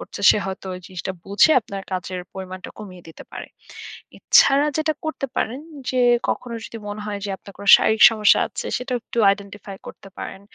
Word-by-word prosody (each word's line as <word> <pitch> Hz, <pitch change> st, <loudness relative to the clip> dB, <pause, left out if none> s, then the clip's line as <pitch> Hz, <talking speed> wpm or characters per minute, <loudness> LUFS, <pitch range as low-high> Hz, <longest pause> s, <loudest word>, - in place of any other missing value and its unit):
করছে -, -, -9 dB
সে -, -, +3 dB
হয়তো 190 Hz, 0 st, -6 dB
ঐ -, -, -6 dB
জিনিসটা 190 Hz, 0 st, -6 dB
বুঝে 200 Hz, +10 st, +4 dB
আপনার 200 Hz, -3 st, -8 dB
কাজের 185 Hz, 0 st, -4 dB
পরিমাণটা 185 Hz, -1 st, -8 dB
কমিয়ে 185 Hz, -4 st, -11 dB
দিতে 160 Hz, -, -12 dB
পারে। -, -, -7 dB, 0.7 s
এছাড়া 280 Hz, +2 st, +4 dB
যেটা 310 Hz, 0 st, +1 dB
করতে 315 Hz, -3 st, -3 dB
পারেন 245 Hz, +5 st, -2 dB, 0.3 s
যে, 255 Hz, -, -4 dB, 0.3 s
কখনো 240 Hz, -1 st, -3 dB
যদি 230 Hz, -, -8 dB
মনে 205 Hz, +1 st, -6 dB
হয় 205 Hz, -1 st, -4 dB
যে -, -, -4 dB
আপনার 200 Hz, -, -14 dB
কোনো 200 Hz, -, -6 dB
শারীরিক 220 Hz, 0 st, +1 dB
সমস্যা 215 Hz, -2 st, +4 dB
আছে -, -, -6 dB
সেটা 250 Hz, +1 st, -6 dB
একটু -, -, -7 dB
identify 200 Hz, 0 st, -9 dB
করতে 195 Hz, -, -11 dB
পারেন। -, -, -7 dB
205 Hz, 180 wpm, -21 LUFS, 190-230 Hz, 0.7 s, বুঝে